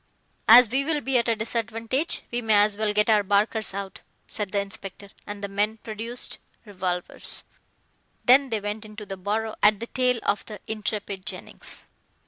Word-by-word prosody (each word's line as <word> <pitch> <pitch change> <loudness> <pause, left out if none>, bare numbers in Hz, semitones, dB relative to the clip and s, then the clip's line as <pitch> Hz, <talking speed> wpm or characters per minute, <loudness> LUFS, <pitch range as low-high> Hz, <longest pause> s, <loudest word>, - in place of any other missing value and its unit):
"As 240 +2 +10
we 265 +5 0
will 305 +1 0
be 270 -3 +2
at 235 - -1
a 230 - +2
disadvantage, 230 +6 -2
we 240 0 -1
may 220 -2 +3
as 205 0 +5
well 215 0 0
get 210 0 +2
our 215 -2 +5
barkers 205 +2 +1
out," 195 -1 -6 0.3
said 205 -3 -4
the 205 - +1
inspector, 200 0 -6 0.2
and 205 0 -6
the - - -1
men 205 +2 0
produced 225 +3 -4 0.3
revolvers. 180 -3 -4 0.8
Then 265 +2 +6
they 220 -2 0
went 210 +1 -4
into 215 0 -9
the 195 - -6
burrow 215 +4 -2
at 210 -1 +5
the 230 - -4
tail 250 0 +1
of 205 - 0
the 210 -2 -7
intrepid 210 -3 -3
Jennings. 190 -3 -7
215 Hz, 175 wpm, -25 LUFS, 205-230 Hz, 0.8 s, As